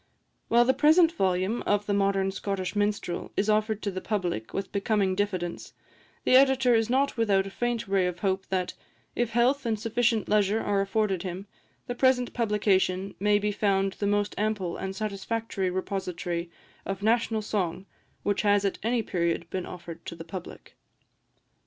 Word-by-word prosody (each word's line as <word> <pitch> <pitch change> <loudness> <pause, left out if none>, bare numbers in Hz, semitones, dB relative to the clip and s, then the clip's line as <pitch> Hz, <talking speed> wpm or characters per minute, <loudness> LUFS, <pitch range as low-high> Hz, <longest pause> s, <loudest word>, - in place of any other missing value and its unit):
While 240 +1 +5
the 260 - +4
present 320 +4 +5
volume 190 - 0
of 205 0 +2
"The 205 - 0
Modern 195 -1 +1
Scottish 195 -1 -3
Minstrel" 205 -4 -1
is 210 +2 +2
offered 215 0 0
to 200 - -1
the 185 0 -5
public 180 - -2
with 195 0 -4
becoming 200 -1 +1
diffidence, 185 -3 -3 0.5
the - - +2
Editor 265 -2 +5
is 225 0 +2
not 270 +1 +1
without 200 -4 +2
a 195 - -7
faint 240 0 -2
ray 195 -2 +2
of 180 -1 -4
hope 195 -1 0
that, 185 -2 -1 0.4
if 240 -1 0
health 245 +5 +2
and 225 -3 -1
sufficient 230 +1 +1
leisure 210 +1 +2
are 200 -2 +1
afforded 195 -2 0
him, 185 +1 -5 0.4
the 245 - -3
present 250 -1 +2
publication 200 -4 +1
may 205 +1 +3
be 210 0 0
found 195 -1 +1
the 200 - -2
most 205 0 +1
ample 210 -5 -1
and 190 0 -5
satisfactory 205 -1 -2
repository 180 -2 -3 0.3
of 195 0 -5
national 225 -1 +1
song 185 -3 -2 0.4
which 205 -1 +1
has 205 -1 +3
at 195 - -1
any 230 +1 0
period 170 -3 -1
been 185 -1 -3
offered 170 -2 -9
to - - -5
the 165 - -9
public. 175 +1 -9
205 Hz, 170 wpm, -27 LUFS, 190-225 Hz, 0.5 s, While